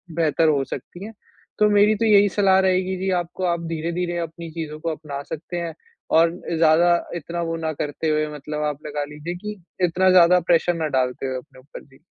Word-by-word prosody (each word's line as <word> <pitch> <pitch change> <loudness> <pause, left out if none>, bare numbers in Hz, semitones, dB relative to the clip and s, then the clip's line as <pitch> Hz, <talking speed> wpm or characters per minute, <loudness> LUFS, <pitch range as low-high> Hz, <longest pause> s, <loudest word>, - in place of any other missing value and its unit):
बेहतर 165 -1 +2
हो 140 -2 +2
सकती 175 +7 -8
हैं। 225 - -9 0.5
तो 210 0 +5
मेरी 205 +1 +4
तो 225 - -1
यही 205 -2 +6
सलाह 190 -1 +3
रहेगी 185 0 +1
जी 190 +1 -2
आपको 175 +2 -6
आप 170 -1 0
धीरे-धीरे 170 +2 -2
अपनी 165 0 -6
चीज़ों 155 -2 -6
को 165 - -3
अपना 145 -3 -6
सकते 170 +4 -6
हैं। 170 -1 -4 0.4
और 165 +1 +5
अ, 170 -1 -5
ज़्यादा 165 +2 +5 0.2
इतना 170 +1 -4
वो - - -1
ना 160 -1 -3
करते 150 +2 -2
हुए 155 0 +1
मतलब 150 +1 -5
आप - - -17
लगा 145 0 -3
लीजिए 155 +4 -6
कि, 210 +2 -7 0.2
इतना 185 +2 +2
ज़्यादा 180 0 +6
प्रेशर 170 +1 +3
ना 160 -2 -1
डालते 125 +1 -2
हुए 130 - -3
अपने 130 - -13
ऊपर। 135 +3 -12
जी। 135 -2 -22
170 Hz, 210 wpm, -22 LUFS, 155-180 Hz, 0.5 s, यही